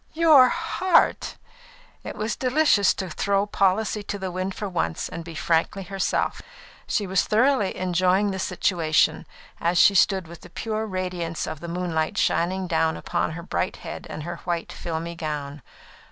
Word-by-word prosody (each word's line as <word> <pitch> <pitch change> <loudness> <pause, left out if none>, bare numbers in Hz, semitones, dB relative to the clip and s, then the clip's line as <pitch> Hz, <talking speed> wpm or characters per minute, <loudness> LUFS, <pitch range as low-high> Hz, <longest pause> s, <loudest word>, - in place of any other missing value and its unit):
"Your 310 -6 +7
heart!" 370 -1 +1 0.7
It - - -6
was 215 +1 -2
delicious 255 -6 +3
to 190 - -4
throw 200 +4 0
policy 205 +1 +1
to 205 0 -5
the 190 -2 -4
wind 185 +1 -3
for 210 - -4
once 170 - -2
and 165 - -7
be 165 -1 -9
frankly 165 +5 0
herself. 195 +1 -1 0.5
She 210 - 0
was 190 0 +1
thoroughly 240 -2 +2
enjoying 185 +2 +2
the 190 - -4
situation, 170 -4 +1 0.3
as 170 +1 +1
she 200 - +7
stood 190 -1 +3
with 170 0 -12
the - - -13
pure 220 +4 -3
radiance 180 -4 -3
of 155 - -6
the 170 - -7
moonlight 170 -2 -2
shining 185 +2 +1
down 160 -2 +1
upon - - -2
her 170 +1 -7
bright - - -2
head - - -7
and 155 - -6
her 175 +2 -5
white, 170 -2 -3
filmy 165 0 -4
gown. 150 -3 -5
185 Hz, 165 wpm, -24 LUFS, 170-200 Hz, 0.7 s, Your